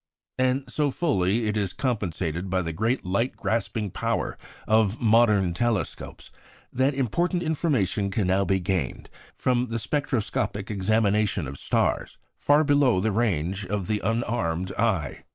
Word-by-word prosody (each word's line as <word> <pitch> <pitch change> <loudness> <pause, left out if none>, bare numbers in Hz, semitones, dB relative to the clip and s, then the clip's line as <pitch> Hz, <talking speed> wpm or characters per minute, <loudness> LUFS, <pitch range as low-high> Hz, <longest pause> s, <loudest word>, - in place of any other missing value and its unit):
And 130 +1 +2
so 150 -1 0
fully 115 - +1
is 105 -3 0
it - - -26
compensated 95 - -2
by 95 0 0
the 80 0 -4
great 110 +9 -1
light 100 +8 -1
grasping 105 -2 -2
power - - -2 0.3
of 110 0 +3
modern 105 -5 +4
telescopes 115 +2 -3 0.4
that 130 +2 +1
important 175 - 0
information 135 - 0
can 100 0 -1
now 95 +2 +2
be 95 0 +1
gained 95 0 -3 0.2
from 125 -1 +1
the 115 0 -3
spectroscopic 110 -6 -2
examination 105 -2 +1
of 70 +1 -7
stars - - 0 0.2
far 145 +2 +4
below 145 -8 +3
the 110 +3 0
range 100 -3 0
of 100 -1 -2
the 105 +2 -1
unarmed 95 -5 -1
eye. 95 - -1
105 Hz, 140 wpm, -25 LUFS, 95-120 Hz, 0.4 s, modern